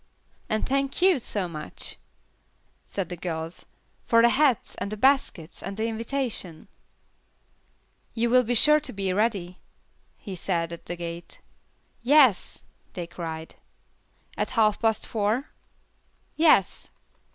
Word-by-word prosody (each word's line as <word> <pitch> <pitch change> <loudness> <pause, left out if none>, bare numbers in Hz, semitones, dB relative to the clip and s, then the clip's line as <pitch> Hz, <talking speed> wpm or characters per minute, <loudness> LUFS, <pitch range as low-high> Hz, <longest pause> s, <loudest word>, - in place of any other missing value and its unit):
"And 215 - 0
thank 275 0 0
you, 370 -6 +5
so 205 -5 -2
much," 155 -3 -5 0.9
said 190 -4 -4
the 180 - -4
girls, 165 -1 -5 0.4
"for 230 0 +5
the 235 - +7
hats, 265 -2 +2
and 200 - -4
the 215 - -4
baskets, 260 - +1
and 195 +1 -6
the 220 - 0
invitation." 230 - -3 1.5
"You 235 0 +1
will 255 0 +6
be 245 +1 -1
sure 300 +6 +6
to 300 - -6
be 195 -2 -1
ready," 195 -4 -1 0.6
he 195 -4 -7
said, 170 -2 -1
at 170 - -11
the 175 - -3
gate. 170 0 -7 0.6
"Yes," 260 -4 +4 0.3
they 175 - -4
cried. 165 -2 -7 0.8
"At - - -1
half 215 -2 +3
past 220 -2 +1
four?" 220 +5 -1 0.8
"Yes." 310 - +3
215 Hz, 130 wpm, -26 LUFS, 175-245 Hz, 1.5 s, the